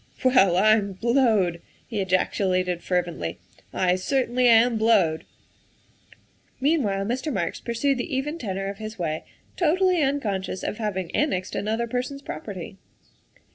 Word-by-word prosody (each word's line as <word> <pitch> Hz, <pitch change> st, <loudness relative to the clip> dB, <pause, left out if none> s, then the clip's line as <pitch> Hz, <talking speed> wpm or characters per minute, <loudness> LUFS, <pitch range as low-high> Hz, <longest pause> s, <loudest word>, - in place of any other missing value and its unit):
"Well, 195 Hz, -9 st, +5 dB
I'm 210 Hz, 0 st, +3 dB
blowed!" 215 Hz, -6 st, +2 dB, 0.2 s
he 215 Hz, -5 st, -3 dB
ejaculated 185 Hz, -1 st, 0 dB
fervently, 170 Hz, -, -2 dB, 0.3 s
"I 180 Hz, -1 st, +1 dB
certainly 250 Hz, +3 st, +1 dB
am 235 Hz, +1 st, +5 dB
blowed! 200 Hz, -8 st, +3 dB, 0.5 s
' -, -, -28 dB
' -, -, -38 dB
Meanwhile 255 Hz, -10 st, +1 dB
Mr. 260 Hz, +7 st, -2 dB
Marks 175 Hz, -8 st, -2 dB
pursued 245 Hz, +3 st, 0 dB
the 260 Hz, -, -3 dB
even 295 Hz, +5 st, -2 dB
tenor 195 Hz, -, -3 dB
of 200 Hz, +1 st, -6 dB
his 215 Hz, 0 st, -7 dB
way, 160 Hz, -3 st, -3 dB, 0.3 s
totally 360 Hz, +1 st, +2 dB
unconscious 205 Hz, -10 st, -1 dB
of 210 Hz, -, -3 dB
having 190 Hz, -5 st, -3 dB
annexed 190 Hz, -11 st, 0 dB
another 220 Hz, +3 st, -1 dB
per 245 Hz, +2 st, -1 dB
son 275 Hz, +2 st, -7 dB
's 275 Hz, -, -16 dB
property. 195 Hz, -6 st, -7 dB
215 Hz, 140 wpm, -24 LUFS, 185-255 Hz, 0.5 s, Well